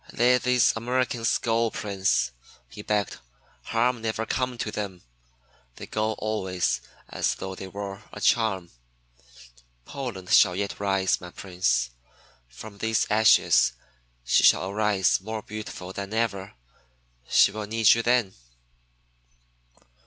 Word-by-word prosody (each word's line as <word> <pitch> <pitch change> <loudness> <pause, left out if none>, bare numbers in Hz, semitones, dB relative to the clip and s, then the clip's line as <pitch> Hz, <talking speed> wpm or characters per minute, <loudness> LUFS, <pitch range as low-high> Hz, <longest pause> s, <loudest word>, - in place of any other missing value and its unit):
"Let 125 +1 +3
these 125 -1 +3
Americans 120 0 0
go, 115 0 0
Prince," 95 -12 0 0.4
he - - -10
begged. 105 -1 -1 0.5
"Harm 120 +1 0
never 110 0 -2
come 125 0 -2
to 110 - -3
them. 100 -4 -5 0.7
They - - -8
go 110 0 -1
always 95 -5 -2 0.3
as - - -1
though 95 - -6
they 95 0 -8
wore 100 +1 -7
a - - -9
charm. 105 -6 +1 1.1
Poland 115 -10 -6
shall 90 -3 +6
yet 100 +1 -3
rise, 95 -2 +1
my 90 - -8
Prince. 90 -8 -1 0.6
From 100 - -12
these 110 +1 +1
ashes 105 - +5 0.5
she - - +3
shall 95 +1 +4
arise 100 -3 +2
more 110 +1 -5
beautiful 105 -3 -7
than 100 +2 -5
ever. 100 - -2 0.7
She - - +5
will 105 0 -6
need 110 0 +5
you 115 - 0
then." 120 -5 +1
105 Hz, 125 wpm, -26 LUFS, 95-115 Hz, 1.1 s, shall